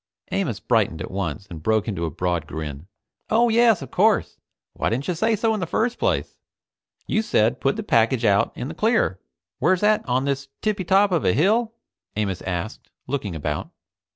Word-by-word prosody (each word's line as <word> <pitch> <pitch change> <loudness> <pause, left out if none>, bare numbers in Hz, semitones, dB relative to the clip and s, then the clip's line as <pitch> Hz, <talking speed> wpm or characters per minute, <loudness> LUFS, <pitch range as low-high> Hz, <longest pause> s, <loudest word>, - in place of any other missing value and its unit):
Amos 160 - -1
brightened 110 -9 +1
at - - -6
once 95 -2 -3
and 85 -5 -9
broke 110 +5 +1
into 95 -6 -2
a - - -1
broad 85 0 -2
grin. 75 +1 -6 0.4
"Oh 235 +2 +4
yes, 225 -6 +4
of - - -10
course. - - +2 0.4
Why - - -1
didn't 125 +5 -2
you 180 - +1
say 220 +7 +1
so 220 +1 +1
in 215 - -2
the 180 - -2
first 240 +7 0
place? - - -1 0.7
You 215 - +1
said, 120 - +1
put 135 - +1
the 220 - -4
package 115 - +2
out 100 -1 +3
in 125 - -4
the 155 - -6
clear. 215 - +1 0.4
Where's 185 +2 +2
that, 210 0 +3
on 130 +2 +1
this 140 0 -2 0.2
tippy 205 -4 0
top 195 +2 +4
of 170 -4 +1
a 90 - +3
hill?" 220 - +2 0.4
Amos 100 -4 -2
asked, 90 +4 -5 0.2
looking 120 -9 -3
about. 75 -1 -3
130 Hz, 190 wpm, -23 LUFS, -, 0.7 s, Oh